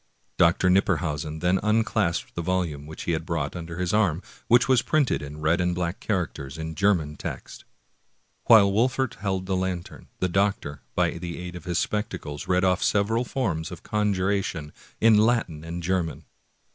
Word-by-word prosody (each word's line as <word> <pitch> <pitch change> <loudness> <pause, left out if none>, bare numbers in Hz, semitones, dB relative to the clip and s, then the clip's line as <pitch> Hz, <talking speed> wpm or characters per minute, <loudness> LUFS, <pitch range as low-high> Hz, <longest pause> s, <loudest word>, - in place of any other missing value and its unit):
Dr. 90 +1 +4
Knipperhausen 80 -5 0
then 90 +2 +2
unclasped 105 - 0
the 85 - -3
volume 85 -5 -2
which 80 - -8
he - - -1
had 80 -1 -1
brought 80 -3 -2
under 85 -1 -6
his 90 0 -1
arm, 95 -5 +2 0.2
which 120 0 +5
was 130 -3 +4
printed 150 -4 +1
in 75 +1 -8
red 80 +4 +2
and 90 0 0
black 85 0 -2
characters 80 -8 -3
in 80 0 -5
German 85 -5 +1
text. - - -7 0.8
While 100 -4 +7
Wolfert 125 +3 +1
held 95 -2 -2
the 95 0 -1
lantern, 95 -2 -4
the 90 - 0
doctor, 95 -6 0
by - - +1
the 85 -1 -5
aid 90 0 -7
of 90 - -9
his 85 -2 -1
spectacles, 90 -10 -3
read 90 0 +2
ofif 90 0 +2
several 110 +3 +2
forms 90 -12 -2
of 90 -3 -10
conjuration 100 -6 -1 0.3
in 110 -1 +6
Latin 110 -9 +1
and 85 +1 -6
German. 85 -3 -1
90 Hz, 170 wpm, -25 LUFS, 80-100 Hz, 0.8 s, While